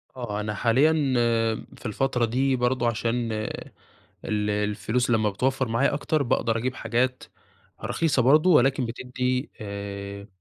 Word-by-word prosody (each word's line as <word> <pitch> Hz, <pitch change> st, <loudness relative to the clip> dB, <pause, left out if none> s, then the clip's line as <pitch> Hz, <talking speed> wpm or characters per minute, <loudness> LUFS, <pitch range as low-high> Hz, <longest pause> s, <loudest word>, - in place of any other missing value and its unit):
آه، 110 Hz, -5 st, -4 dB
أنا 105 Hz, 0 st, -3 dB
حاليًا 125 Hz, +9 st, +3 dB, 0.9 s
في -, -, -16 dB
الفترة 125 Hz, +2 st, 0 dB
دي 130 Hz, +3 st, +1 dB
برضو 125 Hz, 0 st, 0 dB
عشان 115 Hz, 0 st, -1 dB, 0.9 s
ال 105 Hz, -1 st, -1 dB
الفلوس 105 Hz, +4 st, -1 dB
لما 110 Hz, -2 st, +2 dB
بتوفر 130 Hz, +4 st, 0 dB
معايا 135 Hz, +5 st, +1 dB
أكتر، 150 Hz, 0 st, 0 dB
باقدر 115 Hz, -2 st, 0 dB
أجيب 125 Hz, +3 st, -2 dB
حاجات 125 Hz, +3 st, -1 dB, 0.6 s
رخيصة 150 Hz, -6 st, +1 dB
برضو، 155 Hz, +8 st, +5 dB
ولكن 130 Hz, 0 st, +2 dB
بتدي 125 Hz, +3 st, -2 dB
آآ، 100 Hz, -1 st, -6 dB
120 Hz, 125 wpm, -25 LUFS, 105-130 Hz, 0.9 s, برضو